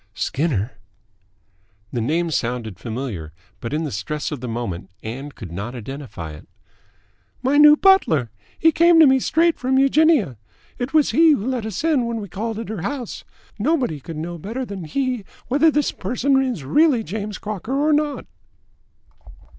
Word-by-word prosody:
"Skinner?" 130 - -1 1.2
The 120 - -1
name 165 +7 0
sounded 120 - -2
familiar, 110 - -5 0.3
but 115 - -5
in 155 +2 -1
the 150 - -3
stress 145 +12 -3
of 145 -5 -5
the 125 - -4
moment 110 -6 -4
Ann 135 +6 -6
could 100 - -10
not 105 +8 -5
identify 120 - -7
it. 75 - -12 1.0
"My 270 +3 +2
new 300 0 +9
butler. 165 - +4 0.3
He 325 - +4
came 335 +1 +5
to 320 - +9
me 265 -1 +5
straight 330 +5 +2
from 260 +1 +1
Eugenia. 275 - +3 0.4
It 245 +1 -3
was 305 -1 +3
he 320 -1 +6
who 210 -7 -2
let 250 -4 -2
us 205 +2 -4
in 295 -7 +2
when 230 -1 -2
we 200 -2 -7
called 220 +4 -4
at 225 -2 -6
her 215 -6 -4
house. 250 - -4 0.4
Nobody 250 - 0
could 160 +3 -8
know 170 +2 -5
better 230 +10 -4
than 195 -6 -7
he 255 - -2 0.3
whether 290 +5 +4
this 295 -2 +1
person 260 +7 +1
is 250 - -2
really 265 - +3
James 210 +1 -5
Crocker 215 +5 -4
or 300 +1 +3
not." 295 -1 0
210 Hz, 170 wpm, -21 LUFS, -, 1.2 s, new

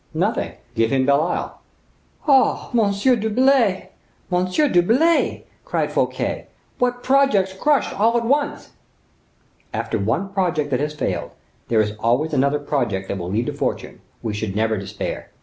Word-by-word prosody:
"Nothing; - - -1 0.2
give 115 -1 +1
him 130 0 +1
Belle 140 +1 +4
Isle." 170 - -3 0.7
"Oh! 270 -3 +3
Monsieur 220 +2 +3
d'Herblay! 225 -2 +2 0.4
Monsieur 185 +11 +2
d'Herblay," 255 - +2 0.2
cried - - -1
Fouquet, - - -1 0.3
"what 245 0 0
projects 260 -9 +3
crushed 290 +9 +1
all 225 +4 +2
at 235 - -1
once!" 285 +4 -1 1.0
"After - - -2
one 195 - -1
project 165 -7 0
that 125 - +1
has 150 +1 -2
failed, - - -3 0.3
there 110 -2 +3
is 105 -1 -1
always 130 +8 +1
another 140 +1 +2
project 120 -10 -2
that 100 - -2
may 85 - -5
lead 105 +7 -1
to - - -3
fortune; - - -4 0.2
we 110 -2 -2
should 105 -2 -4
never 110 +1 +1
despair. 95 -2 -5
180 Hz, 150 wpm, -21 LUFS, -, 1.0 s, Belle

